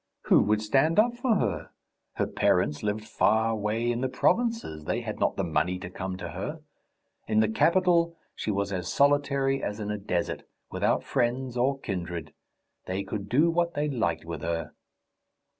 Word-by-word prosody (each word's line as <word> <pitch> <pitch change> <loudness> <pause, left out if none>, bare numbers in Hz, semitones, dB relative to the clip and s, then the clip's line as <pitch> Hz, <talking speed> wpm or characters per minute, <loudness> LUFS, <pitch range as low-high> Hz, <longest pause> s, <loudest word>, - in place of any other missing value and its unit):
Who - - +5
would 105 +1 +1
stand 135 +9 +2
up 235 +3 +4
for 240 -2 +1
her? - - -1 0.4
Her - - 0
parents 75 0 +1
lived 105 +1 -2
far 110 0 +2
away 110 +2 0
in 120 +1 -2
the 130 - 0
provinces; 225 - 0
they - - -1
had - - -5
not - - +1
the 95 - -1
money 90 +2 0
to 90 -1 -8
come 95 0 -4
to - - -6
her. - - -5 0.7
In 110 -1 +2
the 110 - +4
capital 170 - +3 0.2
she - - -4
was 100 -1 -1
as 90 -1 -3
solitary 140 -1 +2
as 105 +1 -3
in 105 -1 -3
a 105 - -3
desert, 90 -3 -2 0.3
without - - +1
friends 125 +1 -1
or 130 +3 +1
kindred. 85 - -5 0.5
They 95 +2 -2
could 100 0 -5
do 150 +8 +4
what 170 0 0
they 150 +1 0
liked 85 - -1
with 80 -3 -5
her. 80 -1 -3
110 Hz, 175 wpm, -27 LUFS, 95-140 Hz, 0.7 s, Who